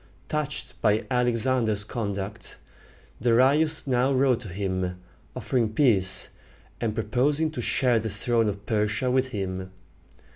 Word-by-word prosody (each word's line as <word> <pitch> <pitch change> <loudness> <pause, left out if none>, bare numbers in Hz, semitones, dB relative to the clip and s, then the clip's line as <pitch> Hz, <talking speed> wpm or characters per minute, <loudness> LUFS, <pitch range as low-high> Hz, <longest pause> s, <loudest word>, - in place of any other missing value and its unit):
Touched 150 -1 -4
by 105 -1 +2
Alexander's 120 -3 +1
conduct, 100 -2 -5 0.6
Darius 135 +7 +3
now 130 0 +2
wrote 130 -2 +3
to 120 - -8
him, 95 -1 -3 0.4
offering 115 -4 -1
peace, 100 -8 +2 0.5
and 110 -2 -1
proposing 140 +8 +1
to 145 - -4
share 120 0 +2
the 110 0 -3
throne 115 +1 0
of 100 0 -6
Persia 110 +4 0
with 130 0 +2
him. 95 -5 -4
115 Hz, 120 wpm, -26 LUFS, 105-130 Hz, 0.6 s, Darius